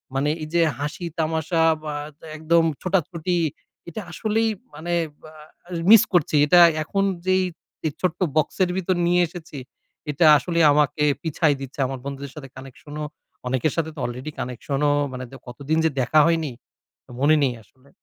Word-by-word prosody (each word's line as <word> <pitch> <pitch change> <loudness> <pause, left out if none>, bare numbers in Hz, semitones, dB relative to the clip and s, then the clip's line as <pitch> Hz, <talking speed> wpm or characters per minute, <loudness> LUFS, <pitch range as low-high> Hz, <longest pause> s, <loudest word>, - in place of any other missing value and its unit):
মানে 140 +2 +1
এইযে 170 +2 0 0.2
হাসি 145 +5 -4
তামাশা 160 +1 0 0.2
বা, 150 -1 -4 0.3
দা - - -14
একদম 165 +2 +3 0.2
ছোটাছুটি, 180 -1 -1 0.5
এটা 170 - -6
আসলেই 220 +4 0 0.3
মানে 170 +3 -4 0.4
আ - - -15 0.6
মিস 225 -2 +9
করছি। 165 -3 +2
এটা 175 +4 +6 0.2
এখন 195 +5 -1 0.2
যেই 185 0 +3 0.4
যে 155 - 0
ছোট্ট 180 -2 -1 0.2
বক্সের 175 +4 +1
ভিতর 185 0 0
নিয়ে 175 +1 +3
এসেছি, 165 -2 -10 0.5
এটা 155 +4 +2
আসলেই 170 0 +1
আমাকে 150 +1 +2 0.2
পিছায়ে 155 -3 +1
দিচ্ছে 135 +1 -9
আমার 135 -1 -5
বন্ধুদের 140 -1 -6
সাথে 135 -3 -9
কানেকশনও। 145 +3 -8 0.4
অনেকের 130 +3 0
সাথে 160 -1 -1
তো 150 - -9
আলরেডি 125 +5 -5
কানেকশনও 135 +4 -1 0.2
মানে 130 0 -6
দ - - -16
কতদিন 140 +5 -2
যে - - +4
দেখা 130 +5 +3
হয়নি, 165 -3 +1 0.7
মনে 145 +3 +4
নেই 130 -3 +1
আসলে। 130 +6 -26
155 Hz, 155 wpm, -23 LUFS, 140-170 Hz, 0.7 s, মিস